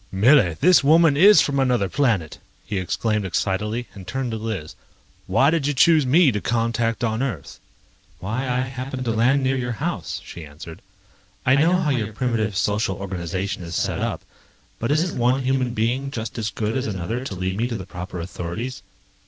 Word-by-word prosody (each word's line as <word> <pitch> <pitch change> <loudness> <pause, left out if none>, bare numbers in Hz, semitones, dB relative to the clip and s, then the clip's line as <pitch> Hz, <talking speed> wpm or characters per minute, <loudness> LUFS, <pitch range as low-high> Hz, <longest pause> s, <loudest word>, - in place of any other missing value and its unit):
"Millie, 100 - +4
this 180 - +5
woman 160 +1 +5
is 190 +3 +7
from 140 -1 0
another 125 -6 +2
planet!" 110 - 0 0.3
he 100 - -2
exclaimed 105 +3 -1
excitedly, 105 +6 -2
and 95 -2 -11
turned 130 +3 -3
to 110 - -3
Liz. 110 -8 -5 0.5
"Why 140 +3 +3
did 160 -4 0
you 145 - 0
choose 155 0 +5
me 150 +2 +5
to 105 -2 -3
contact 115 0 -1
on 110 0 0
Earth?" 120 - -4 0.6
"Why, 115 +7 -3
I 125 0 +1
happened 130 0 -5
to 115 - 0
land 125 +5 +2
near 130 +1 +1
your 120 -2 -2
house," 150 - -4
she 85 - -9
answered. 75 +2 -11 0.6
"I 130 - +4
know 160 +5 +3
how 160 -5 0
your 110 -5 -2
primitive 110 -4 -1
social 100 +1 0
organization 95 0 -4
is 85 -1 -6
set - - -1
up, - - -3 0.6
but 115 - -2
isn't 155 0 0
one 125 +3 +2
human 130 -2 0
being 125 +5 0
just 115 -4 -5
as 110 0 -1
good 110 0 -3
as 130 0 -1
another 105 +5 -3
to 105 - -5
lead 95 +1 -2
me 115 +3 0
to 120 - -4
the 95 -4 -6
proper 90 +1 -7
authorities?" 90 +8 -5
115 Hz, 185 wpm, -22 LUFS, 100-135 Hz, 0.6 s, is